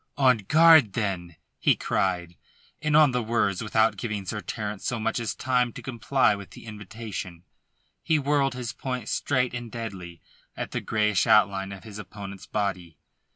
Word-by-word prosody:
"On 130 -4 +4
guard, 155 0 +6
then," 90 -6 -3 0.2
he - - +4
cried, 90 -2 -1 0.5
and 150 0 +3
on 150 -3 +6
the 125 0 0
words, 110 -4 0
without 110 -1 +2
giving 105 -2 -4
Sir 105 +3 -4
Terence 105 -3 -5
so 120 - -2
much 110 +1 -1
as 115 -2 -3
time 125 -2 +1
to - - -8
comply 130 0 +2
with 100 -1 -8
the - - -13
invitation, 105 -5 -7 0.6
he 160 - +2
whirled 140 -2 +1
his 125 -1 -4
point 125 -5 -4
straight 130 -3 0
and 120 -2 -6
deadly 95 -7 -7 0.4
at - - -4
the - - -2
greyish 105 -4 +1
outline 100 -2 +3
of 100 -1 -9
his 105 -2 -9
opponent's 100 -1 -9
body. 90 -6 -3
110 Hz, 165 wpm, -26 LUFS, 100-125 Hz, 0.6 s, guard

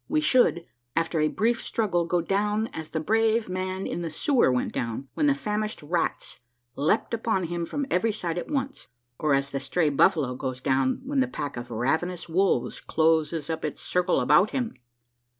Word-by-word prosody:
We 310 - +2
should, 240 - +3 0.3
after 165 0 0
a 155 - +3
brief 230 +8 0
struggle, 185 -7 0
go 175 0 +1
down 210 +5 0
as 160 -1 -6
the 160 - -2
brave 225 +6 +2
man 185 +1 -3
in - - -3
the 170 - -3
sewer 255 - +2
went 125 - -1
down, 120 +3 -3
when 300 - +1
the 280 - +4
famished 215 - -3
rats 165 +3 -2 0.4
leaped 160 +12 +1
upon 225 -4 0
him 170 0 -3
from 285 -1 -2
every 200 +5 +2
side 175 -5 -3
at - - -7
once, 275 -2 -3 0.3
or 150 -2 +3
as 140 0 -1
the 135 - -2
stray 155 +4 +1
buffalo 145 -2 +3
goes 130 0 -4
down 130 - +1
when 280 +1 0
the 260 - +3
pack 145 - -5
of 120 0 -7
ravenous 160 +11 -1
wolves 175 -6 +1
closes 160 -1 +1
up 160 -1 -3
its 150 - -3
circle 180 0 +1
about 150 +11 +5
him. 245 -4 -2
175 Hz, 185 wpm, -26 LUFS, 150-215 Hz, 0.4 s, about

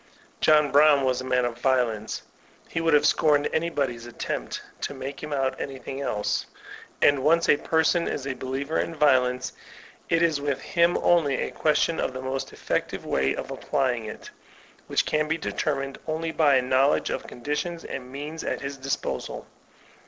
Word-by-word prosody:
John 150 -2 +4
Brown 145 -1 +6
was 130 -1 +1
a - - -6
man 125 -1 +2
of 120 -1 -4
violence; 120 -4 0 0.4
he 165 - -2
would 165 -2 +4
have 145 0 +4
scorned 150 -2 +3
anybody's 140 -8 -1
attempt 120 - -4 0.2
to 140 - -3
make 135 +1 -6
him 150 - -6
out 135 -2 -1
anything 135 0 -6
else. 105 -6 -1 0.6
And 145 -1 +5
when - - -5
once 165 +2 +4
a - - +6
person 160 +3 +2
is 135 - -3
a 140 - -2
believer 135 +4 -3
in 165 - -2
violence, 130 -4 +2 0.6
it 165 0 +3
is 160 -4 +2
with 140 -2 -1
him 170 0 +2
only 160 -6 +4
a - - -2
question 160 +1 +1
of - - -1
the 130 - -5
most 130 0 -3
effective - - -3
way 65 0 +1
of - - -6
applying 130 -5 -1
it, 105 - -8 0.6
which - - +1
can 155 0 +1
be 160 +1 0
determined 135 -4 -2
only 160 +1 -2
by 150 -4 +4
a 130 - +3
knowledge 130 +3 +2
of - - -4
conditions 150 +6 -4
and 125 -1 -6
means 150 +4 -6
at - - -2
his 140 0 -5
disposal. 135 +1 -3
140 Hz, 175 wpm, -26 LUFS, 130-155 Hz, 0.6 s, Brown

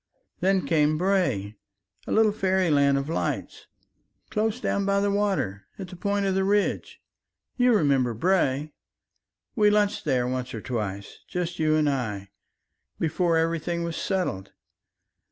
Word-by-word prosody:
Then 190 +1 +2
came 155 -1 +2
Bray, 150 - 0 0.5
a - - -4
little 220 -1 +4
fairyland 180 -9 +2
of 140 0 -2
lights 165 - -3 0.6
close 220 +2 0
down 200 -5 -1
by 200 0 +2
the 200 0 +1
water 190 - -1
at 190 -2 -7
the 180 - -9
point 200 +2 -1
of 195 - +1
the 190 0 +1
ridge... 205 +1 0 0.6
you 250 -1 +3
remember 135 - +2
Bray, 150 - +1 0.8
we 210 -2 +4
lunched 210 0 +1
there 130 -4 +1
once 125 -1 -3
or 110 - -5
twice, 105 -5 -5
just 175 -1 -4
you 155 -1 +2
and 155 -1 +2
I, 105 -8 -2 0.7
before 165 +1 +1
everything 165 +1 -1
was 170 -1 -3
settled 180 - -2
170 Hz, 140 wpm, -25 LUFS, 135-195 Hz, 0.8 s, little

